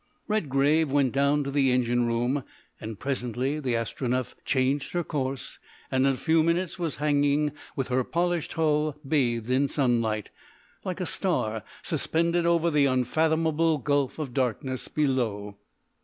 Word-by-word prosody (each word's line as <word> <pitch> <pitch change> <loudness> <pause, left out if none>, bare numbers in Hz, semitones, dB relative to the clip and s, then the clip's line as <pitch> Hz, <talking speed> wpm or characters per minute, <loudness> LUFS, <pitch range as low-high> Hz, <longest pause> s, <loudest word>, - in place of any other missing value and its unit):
Redgrave 150 -6 +2
went 140 -3 +2
down 140 +2 +2
to 140 - -4
the 135 -2 +3
engine 120 -1 +2
room, 120 +4 0 0.4
and 110 -1 -6
presently 130 +2 -2
the 130 -5 -1
Astronef 125 +2 -2
changed 135 +1 0
her 175 -1 0
course, 135 -3 -4 0.3
and 130 +1 +3
in 135 - +3
a - - -5
few 160 +3 +3
minutes 170 +2 0
was 165 -6 -2
hanging 145 0 +2 0.2
with 135 -2 -2
her 130 0 +2
polished 175 +2 -1
hull 155 -2 +1
bathed 120 -5 +1
in 135 +2 +3
sunlight, 115 -6 0 0.5
like - - -4
a - - -1
star - - -1 0.2
suspended 170 +1 0
over 170 0 +3
the 145 -2 +4
unfathomable 160 +5 +2
gulf 145 0 0
of 145 -6 -4
darkness 130 0 -1
below. 115 -9 -1
140 Hz, 145 wpm, -27 LUFS, 125-155 Hz, 0.5 s, the